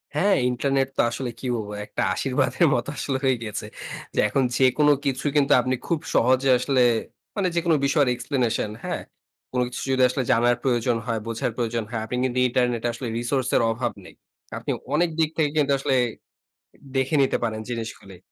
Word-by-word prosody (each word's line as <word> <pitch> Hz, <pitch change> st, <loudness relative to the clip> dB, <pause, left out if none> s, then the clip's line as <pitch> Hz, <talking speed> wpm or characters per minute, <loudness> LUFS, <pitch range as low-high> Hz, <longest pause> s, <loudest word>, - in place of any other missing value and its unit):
হ্যাঁ, 195 Hz, +6 st, +3 dB
ইন্টারনেট 135 Hz, +2 st, 0 dB
তো -, -, +5 dB
আসলে 125 Hz, +2 st, -3 dB
কি -, -, -8 dB
বলবো? 105 Hz, -2 st, -5 dB
একটা -, -, -4 dB
আশীর্বাদের -, -, +1 dB
মতো -, -, -2 dB
আসলে 135 Hz, -2 st, -1 dB
হয়ে 130 Hz, -1 st, +4 dB
গিয়েছে। 105 Hz, -3 st, -5 dB, 0.6 s
এখন 135 Hz, +5 st, +1 dB
যেকোন 135 Hz, +3 st, +4 dB, 0.2 s
কিছু 135 Hz, 0 st, -1 dB
কিন্তু 145 Hz, -1 st, +4 dB
আপনি 130 Hz, +1 st, 0 dB
খুব 170 Hz, -3 st, +1 dB, 0.2 s
সহজে 130 Hz, +2 st, +3 dB
আসলে, 130 Hz, +1 st, +1 dB, 0.5 s
মানে 200 Hz, -3 st, +1 dB
যেকোনো 170 Hz, -2 st, +2 dB
বিষয়ের 140 Hz, -1 st, +3 dB
এক্সপ্লেনেশন, 120 Hz, -4 st, -1 dB
হ্যাঁ? -, -, -3 dB, 0.5 s
কোন 125 Hz, -, -1 dB
কিছু 125 Hz, -, -6 dB
যদি 130 Hz, 0 st, +2 dB
আসলে 130 Hz, +1 st, -1 dB
জানার 120 Hz, +1 st, +4 dB
প্রয়োজন 120 Hz, -2 st, +1 dB
হয়, 115 Hz, -2 st, -1 dB
বোঝার 115 Hz, +1 st, -2 dB
প্রয়োজন 115 Hz, -1 st, -1 dB
হয়, 115 Hz, -2 st, -3 dB
আপনি 125 Hz, -, -4 dB
কিন্তু 130 Hz, -1 st, 0 dB
ইন্টারনেট 125 Hz, -2 st, 0 dB
আসলে 120 Hz, +2 st, -6 dB
রিসোর্স 125 Hz, +2 st, -1 dB
এর -, -, +4 dB
অভাব 120 Hz, +1 st, -2 dB
নেই। -, -, -14 dB, 0.4 s
আপনি -, -, -3 dB, 0.2 s
অনেক 170 Hz, +2 st, +3 dB
দিক 160 Hz, -2 st, +3 dB
থেকে 155 Hz, -2 st, +2 dB
কিন্তু 145 Hz, -2 st, +3 dB
আসলে 135 Hz, 0 st, 0 dB, 1.0 s
দেখে 135 Hz, +3 st, +1 dB
নিতে 135 Hz, -, +2 dB
পারেন 110 Hz, -2 st, -1 dB
জিনিসগুলি। 110 Hz, -5 st, -6 dB
130 Hz, 175 wpm, -24 LUFS, 120-140 Hz, 1.0 s, তো